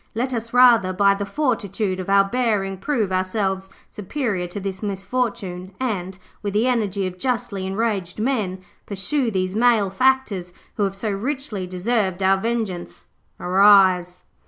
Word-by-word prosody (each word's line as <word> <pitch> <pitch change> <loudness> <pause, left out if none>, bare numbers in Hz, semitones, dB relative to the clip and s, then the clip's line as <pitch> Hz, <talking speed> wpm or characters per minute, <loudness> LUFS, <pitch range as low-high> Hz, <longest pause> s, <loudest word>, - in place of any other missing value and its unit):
Let 255 +3 -1
us, 230 -1 -4
rather, 235 -7 +5
by 200 +1 +4
the 200 0 -4
fortitude 210 -8 -1
of 185 - -5
our 200 0 +6
bearing 200 -4 -1
prove 230 -9 -1
ourselves 190 0 -1 0.2
superior 210 -4 -3
to 175 +3 -6
this 190 -1 -5
misfortune 195 -3 -3
and, 190 -7 -3 0.2
with 205 -1 -4
the 220 +3 +3
energy 210 -6 0
of 185 0 -6
justly 205 -6 -2
enraged 195 -3 -2
men, 215 -6 -1 0.2
pursue 235 +6 -1
these 185 -2 -2
malefactors, 220 -3 +2 0.2
who 205 - +1
have 195 0 -3
so 210 +2 -2
richly 220 -2 -3
deserved 190 0 -1
our 190 +1 +4
vengeance. 215 -4 -3 0.3
Arise!' 185 -1 +4
200 Hz, 140 wpm, -22 LUFS, 185-230 Hz, 0.3 s, our